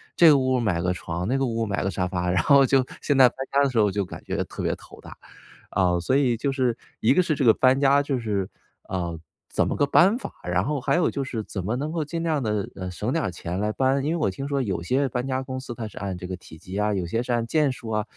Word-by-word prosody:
这 170 - +7
个 145 - +7
屋 130 -1 +1
买 95 -7 0
个 90 +1 0
床， 90 0 -4
那 135 - +1
个 135 - +1
屋 115 -1 -1
买 100 -1 -2
个 - - +1
沙 90 - -1
发， 90 -1 -2
然 90 -2 +2
后 140 -1 +6
就 130 -1 +3 0.2
现 145 -2 +1
在 130 -2 +8
搬 - - -24 0.2
家 140 0 +4
的 140 - +2
时 120 -3 0
候 105 -1 +4
就 100 0 -1
感 - - -9
觉 - - -1
特 - - -7
别 - - 0
头 - - -15
大。 - - -12 0.5
啊， 90 -2 +2
所 130 +10 +1
以 130 -4 +2
就 135 +4 -1
是， 125 -3 0 0.2
一 115 - +4
个 185 - +4
是 160 -3 0
这 135 - -1
个 115 - +7
搬 130 +1 +4
家 140 0 +5
就 140 -2 -1
是， 100 -4 -2 0.4
呃， 85 -3 -3 0.3
怎 - - +1
么 - - -1
个 145 - +3
搬 185 +9 +5
法 - - -7
儿， - - -3
然 90 +1 +2
后 145 -1 -1
还 - - +1
有 175 - +2
就 140 - -3
是 115 -4 -4
怎 95 -3 -5
么 110 +5 -1
能 150 +4 -3
够 160 -3 -1
尽 165 +3 -4
量 160 -4 0
地， 105 -3 -1
嗯， 95 -1 -5
省 - - -3
点 - - 0
儿 - - -2
钱 90 +2 -5
来 105 0 0
搬。 135 +2 +1
因 155 - 0
为 - - 0
我 150 - +1
听 135 +9 -5
说 140 -2 0
有 95 -7 -2
些 135 +6 +1
搬 125 +2 -2
家 130 0 -1
公 130 0 -5
司 125 -2 -7
它 115 -2 -5
是 - - -10
按 95 -2 -4
这 90 - -7
个 95 - -4
体 80 -2 -14
积 95 +4 -7
啊， 105 0 +1
有 95 -2 -1
些 115 +7 -1
是 125 - -2
按 120 -1 +1
件 150 0 +2
数 115 -3 -8
啊， 110 -1 -1
120 Hz, 320 characters per minute, -25 LUFS, 95-135 Hz, 0.5 s, 在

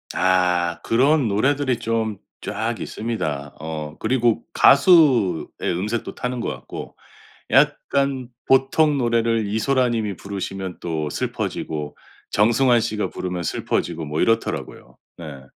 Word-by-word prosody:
아 90 -2 +2
그런 135 +3 +3
노래들이 130 +4 +1
좀 110 -2 -1 0.2
쫙 - - -3
있습니다. 75 -11 -4
어 75 -1 -6
그리고 120 -1 +1
가수의 135 - +5 0.2
음색도 105 +7 -2
타는 125 0 -3
것 - - -3
같고. - - -7 0.6
약간 135 -3 +2 0.2
보통 140 +3 +3
노래를 115 -3 +1
이소라 125 +5 +1
님이 110 -4 -2
부르시면 95 -1 -5
또 80 -3 -2
슬퍼지고 75 0 -4 0.3
정승환 120 +3 +4
씨가 105 -1 -2
부르면 90 -1 -4
슬퍼지고 80 +1 -2
뭐 75 +1 -2
이렇더라고요. 115 0 -2 0.2
네. 75 -5 -9
110 Hz, 265 characters per minute, -22 LUFS, 90-125 Hz, 0.6 s, 가수의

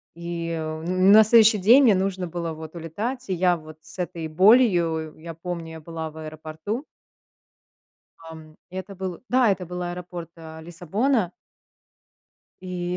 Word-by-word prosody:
И, 170 0 -5
э, 160 -1 -4
на 185 +5 +6
следующий 220 0 +6
день 235 +9 +6
мне 215 -6 +6
нужно 185 -1 -1
было 170 -1 -4
вот 160 +1 -10
улетать. 210 - -5
И - - +1
я 180 0 +2
вот 155 0 -13
с - - -11
этой 170 -2 -4
болью, 175 -4 +3
я 165 +1 -8
помню, 170 -1 -6
я 160 - -9
была 160 0 -6
в 160 - -15
аэропорту 155 - -6 1.3
Ам, 160 -1 -12
это 190 +1 -7
был 185 -2 -6
Да, 250 -4 +4
это 185 -2 -2
был 180 +1 -5
аэропорт, 175 -1 -6
а, 160 -1 -10
Лиссабона. 180 - -1 1.3
И 180 -1 -3
175 Hz, 150 wpm, -24 LUFS, 160-195 Hz, 1.3 s, на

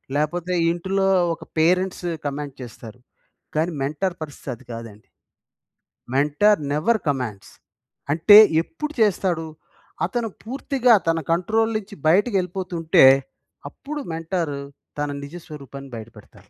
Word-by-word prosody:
లేపోతే 175 +4 -1 0.2
ఇంటులో 190 +3 0 0.3
ఒక - - -9 0.2
parents 180 +3 +1 0.2
command 145 -1 -4
చేస్తారు. 120 -1 -10 0.6
కానీ 165 +3 +1
మెంటార్ 175 +6 -2
పరిస్థితి 145 -2 -8
అది 120 - -19
కాదండి. 115 -2 -9 1.1
Mentor 150 +10 +3
never 160 +11 +2
commands. 125 -8 -3 0.6
అంటే 170 +7 +7 0.2
ఎప్పుడు 305 - -6
చేస్తాడు? 180 -5 +1 0.6
అతను 240 -2 -2 0.2
పూర్తిగా 255 0 +2
తన 165 0 +2
కంట్రోల్ 220 +7 +1
నుంచి 205 -1 -9
బయటికెళ్ళిపోతుంటే 180 - +2 0.7
అప్పుడు 300 +1 -7
మెంటార్ 165 -2 -2 0.4
తన 145 0 -1
నిజ 140 +4 -9
స్వరూపాన్ని 140 -2 -10
బయట 110 -1 -7
పెడతాడు. 105 - -18
165 Hz, 110 wpm, -22 LUFS, 145-195 Hz, 1.1 s, అంటే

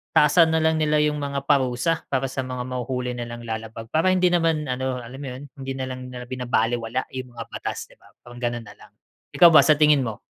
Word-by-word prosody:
taasan 160 +2 +5
nalang 160 0 +2
nila 150 -1 +2
yung 150 0 0
mga 140 -1 -3
parusa 135 +3 +1
para 135 -1 0
sa - - -5
mga 125 -1 -4
mahuhuli 125 0 -3
nilang 120 0 -6
lalabag 110 0 -6
para 160 +4 +2
hindi 180 -1 +3
naman, 165 -3 +1
ano, 130 0 -2
alam 125 +4 -10
mo 140 - -6
'yon, 135 - -9 0.2
hindi 135 0 -4
nalang 130 -1 -5
nila 125 -1 -7
binabalewala 120 -1 -1
yung 130 -2 -6
mga 115 - -5
batas, - - -5
'di - - -21
ba, - - -21 0.2
parang 120 0 -11
gano'n 120 -1 -2
nalang. - - -15 0.4
Ikaw 175 - +8
ba, - - +9
sa 155 - +6
tingin 150 -1 +5
mo? 110 -1 -5
130 Hz, 210 wpm, -23 LUFS, 120-150 Hz, 0.4 s, ba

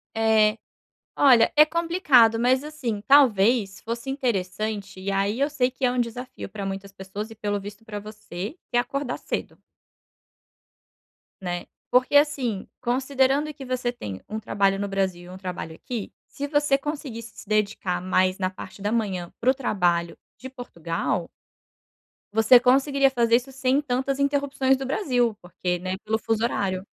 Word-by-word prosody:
É. 220 -1 +3 0.6
Olha 245 -5 +6
é 305 - +9
complicado, 305 - +4
mas, 255 +3 +3
assim, 255 -9 -4
talvez 225 -6 +4
fosse 235 +3 -5
interessante 205 -5 -2
e 200 +1 -2
aí 200 +5 0
eu 285 - +3
sei 255 -4 +1
que 260 +1 -11
é 245 - +4
um 250 - -1
desafio 245 +2 -4
pra 200 -2 -6
muitas 195 0 -5
pessoas 195 +3 -7
e 225 - -11
pelo 205 -1 -2
visto 205 +2 -10
pra 210 -2 -6
você, 210 -1 -7 0.2
que 240 - +2
é - - +6
acordar 250 +1 -2
cedo - - -5 1.8
né. 175 -1 -3 0.3
Porque, 250 +3 +3
assim, 265 -9 +2
considerando 270 +4 +1
que 275 -2 -9
você 250 -1 -1
tem 100 - -7
um 215 - -3
trabalho 195 -2 +1
no 200 - -2
Brasil 190 -3 -1
e 175 - -12
um - - -8
trabalho 180 -4 -6
aqui, 230 +3 -6 0.2
se 285 - -5
você 290 -1 +2
conseguisse 270 -7 -6
se - - -12
dedicar 200 -4 0
mais 185 0 +2
na 185 -1 0
parte 190 +1 -10
da 205 +1 -1
manhã 190 -7 -2
para 250 - +2
o - - +6
trabalho 175 -9 0 0.2
de 260 - -8
Portugal 170 -8 -3 1.0
você 225 +3 +6
conseguiria 275 +2 +3
fazer 235 -2 +3
isso 260 +2 -7
sem 265 +2 +1
tantas 270 0 -1
interrupções 280 -2 +1
do 270 - -5
Brasil, 250 - +1
porque, 180 0 -3
né, 185 +1 -3
pelo 220 +1 0
fuso 225 0 -1
horário 195 -5 -1
230 Hz, 160 wpm, -25 LUFS, 195-265 Hz, 1.8 s, é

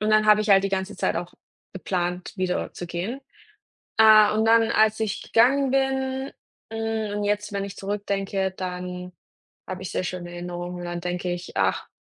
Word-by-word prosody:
Und 215 0 0
dann 215 0 +5
habe 210 0 +6
ich 215 - -2
halt 195 0 +6
die - - +1
ganze 195 +1 -3
Zeit - - 0
auch 175 +1 -5 0.4
geplant, 180 -1 -3
wieder 185 -1 -1
zu 175 - -7
gehen. 185 +10 -4 0.8
Äh, 215 -1 +8
und 215 +1 +1
dann, 225 0 +5
als 215 0 +3
ich 215 -2 -2
gegangen 265 +4 +3
bin, 265 0 0 0.4
hm, 225 -2 -2
und 205 - -2
jetzt, 210 +1 -1
wenn 200 -1 -2
ich 200 0 -8
zurückdenke, 195 -1 -2
dann 180 -1 -6 0.6
habe 185 0 -5
ich 185 - -6
sehr - - -1
schöne 175 -1 -5
Erinnerungen 175 0 -6
und - - -6
dann 175 0 -4
denke 180 0 -2
ich: 175 0 -7
„Ach, 95 0 +1
195 Hz, 185 wpm, -25 LUFS, 180-220 Hz, 0.8 s, Äh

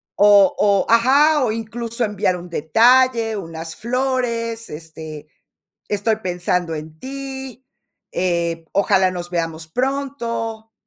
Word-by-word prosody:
o 205 -2 +6
o 200 -1 +3
¡ajá!, 275 +6 +5
o 225 - 0
incluso, 230 +1 -4
enviar 205 -4 0
un 175 0 -10
detalle, 230 - +3
unas 165 -2 -7
flores. 235 -2 -2
Este, 155 -1 -9 0.6
estoy 210 +2 0
pensando 180 -4 -1
en 155 +1 -8
ti, 265 -1 -7 0.5
eh, 170 -2 -1
ojalá 195 -2 +3
nos 175 -1 -6
veamos 165 -2 -3
pronto. 235 - -3
215 Hz, 110 wpm, -20 LUFS, 175-240 Hz, 0.6 s, o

